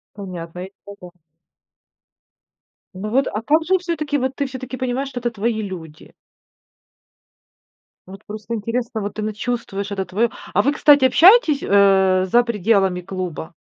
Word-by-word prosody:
Понятно, 180 Hz, -3 st, -7 dB
и 195 Hz, -, -17 dB
это 200 Hz, -, -10 dB, 0.2 s
да. 180 Hz, -, -37 dB, 1.7 s
Ну 190 Hz, +3 st, -6 dB
вот, 265 Hz, +3 st, +2 dB
а 210 Hz, -, -3 dB
как 310 Hz, +6 st, +2 dB
же 375 Hz, +3 st, +2 dB
все-таки, 310 Hz, -5 st, -2 dB
вот 260 Hz, 0 st, -2 dB
ты 280 Hz, -, -1 dB
все-таки 255 Hz, -1 st, -7 dB
понимаешь, 255 Hz, +1 st, -2 dB
что 250 Hz, -2 st, -6 dB
это 240 Hz, 0 st, -1 dB
твои 220 Hz, 0 st, -2 dB
люди? 165 Hz, -6 st, -9 dB, 1.9 s
Вот 195 Hz, +2 st, -12 dB
просто 215 Hz, +2 st, -6 dB
интересно, 230 Hz, +1 st, -3 dB
вот 205 Hz, 0 st, -5 dB
ты 215 Hz, -, -5 dB
на 215 Hz, -, -2 dB
чувствуешь 210 Hz, -3 st, -4 dB
это 195 Hz, -1 st, -2 dB
твое, 205 Hz, +6 st, 0 dB, 0.2 s
а -, -, +2 dB
вы, 280 Hz, -, +2 dB
кстати, 290 Hz, -3 st, +5 dB
общаетесь, 330 Hz, -, +5 dB
э, 190 Hz, -2 st, +3 dB
за 240 Hz, +4 st, +5 dB
пределами 200 Hz, -4 st, +1 dB
клуба, 180 Hz, -3 st, -6 dB
215 Hz, 155 wpm, -20 LUFS, 195-260 Hz, 1.9 s, кстати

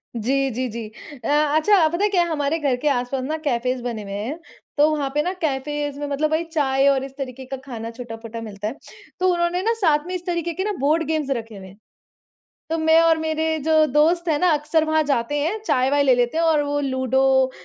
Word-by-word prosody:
जी, 270 Hz, +4 st, 0 dB
जी, 255 Hz, +2 st, -2 dB
जी। 230 Hz, 0 st, -6 dB, 0.4 s
अ, -, -, -1 dB
अच्छा 310 Hz, +5 st, +4 dB
पता 345 Hz, +5 st, -2 dB
है 420 Hz, -, +3 dB
क्या 365 Hz, -3 st, +3 dB
हमारे 295 Hz, +1 st, 0 dB
घर 280 Hz, -4 st, +1 dB
के 300 Hz, -, 0 dB
आस-पास 255 Hz, 0 st, -1 dB
ना 305 Hz, +4 st, -2 dB
कैफेस 250 Hz, 0 st, 0 dB
बने 235 Hz, -3 st, -4 dB
हुए 200 Hz, -, -8 dB
हैं, 220 Hz, +11 st, -4 dB, 0.4 s
तो 295 Hz, +1 st, +5 dB
वहाँ 285 Hz, -2 st, -2 dB
पे 295 Hz, -, +2 dB
ना 360 Hz, +3 st, -2 dB
कैफेस 290 Hz, -1 st, -2 dB
में 290 Hz, 0 st, -4 dB
मतलब 290 Hz, +2 st, -1 dB
वही 315 Hz, +2 st, +1 dB
चाय 275 Hz, -3 st, +2 dB
और 275 Hz, -1 st, +3 dB
इस 270 Hz, 0 st, -9 dB
तरीके 265 Hz, -1 st, -6 dB
का 270 Hz, +1 st, -6 dB
खाना 230 Hz, -4 st, -6 dB
छोटा-पोटा 230 Hz, -1 st, -8 dB
मिलता 210 Hz, -2 st, -6 dB
है। 230 Hz, -, -4 dB, 0.4 s
तो 370 Hz, -, +2 dB
उन्होंने 345 Hz, +1 st, 0 dB
ना 455 Hz, +2 st, +2 dB
साथ 300 Hz, -4 st, +3 dB
में 365 Hz, -, -3 dB
इस 355 Hz, -1 st, -6 dB
तरीके 340 Hz, -1 st, -2 dB
के 375 Hz, -, -3 dB
ना 420 Hz, -, -1 dB
बोर्ड 305 Hz, +5 st, +2 dB
गेम्स 310 Hz, -3 st, -1 dB
रखे 225 Hz, -2 st, -8 dB
हुए 190 Hz, -1 st, -10 dB
हैं। 190 Hz, +2 st, -15 dB, 0.9 s
तो 325 Hz, -, 0 dB
मैं 320 Hz, 0 st, +4 dB
और 330 Hz, -1 st, +4 dB
मेरे 315 Hz, 0 st, -1 dB
जो 315 Hz, -1 st, +4 dB
दोस्त 330 Hz, +5 st, +3 dB
है 305 Hz, -, +2 dB
ना 360 Hz, -, +3 dB
अक्सर 300 Hz, +2 st, +1 dB
वहाँ 315 Hz, 0 st, +2 dB
जाते 280 Hz, -2 st, -1 dB
हैं, 330 Hz, +9 st, -1 dB
चाय-वाय 275 Hz, -2 st, +2 dB
ले 265 Hz, -2 st, +5 dB
लेते 245 Hz, +4 st, 0 dB
हैं 335 Hz, -, +2 dB
और 315 Hz, -2 st, +3 dB
वो 290 Hz, 0 st, -1 dB
लूडो, 265 Hz, -1 st, +2 dB
290 Hz, 230 wpm, -22 LUFS, 255-320 Hz, 0.9 s, तो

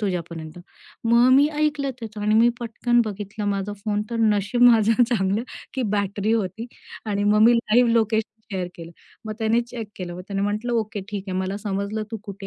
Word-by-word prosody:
तुझ्यापर्यंत." 170 Hz, -5 st, -4 dB, 0.5 s
मग 235 Hz, +2 st, +5 dB
मी 280 Hz, +2 st, +6 dB
ऐकलं 295 Hz, -2 st, 0 dB
त्याचं 220 Hz, -2 st, -7 dB
आणि 210 Hz, +1 st, +1 dB
मी 230 Hz, +2 st, +6 dB
पटकन 240 Hz, +1 st, +1 dB
बघितलं 210 Hz, 0 st, -5 dB
माझा 200 Hz, 0 st, -2 dB
फोन 210 Hz, -1 st, 0 dB
तर 235 Hz, -, -2 dB
नशीब 215 Hz, +2 st, +2 dB
माझं 230 Hz, -1 st, +6 dB
चांगलं, 215 Hz, -3 st, +1 dB, 0.3 s
की 260 Hz, -, -1 dB
बॅटरी 200 Hz, +1 st, -1 dB
होती 220 Hz, +1 st, -2 dB, 0.4 s
आणि 205 Hz, -1 st, -1 dB
मग 210 Hz, +1 st, +3 dB
मी 235 Hz, +2 st, +7 dB
लाईव्ह 235 Hz, +1 st, +3 dB
लोकेशन 220 Hz, -1 st, 0 dB
शेअर 185 Hz, -2 st, -2 dB
केलं. 165 Hz, -1 st, -9 dB, 0.3 s
मग 215 Hz, -, -4 dB
त्याने 225 Hz, +1 st, +2 dB
चेक 235 Hz, -2 st, -7 dB
केलं, 175 Hz, -2 st, -6 dB
मग 180 Hz, -, -8 dB
त्याने 195 Hz, -1 st, -2 dB
म्हटलं, 210 Hz, +4 st, -1 dB
"ओके 215 Hz, -3 st, -1 dB
ठीक 200 Hz, -2 st, -4 dB
आहे, 185 Hz, 0 st, -2 dB
मला 190 Hz, +1 st, -2 dB
समजलं 200 Hz, +1 st, -3 dB
तू 225 Hz, -, -3 dB
कुठे 200 Hz, -1 st, -8 dB
215 Hz, 190 wpm, -23 LUFS, 200-230 Hz, 0.5 s, मी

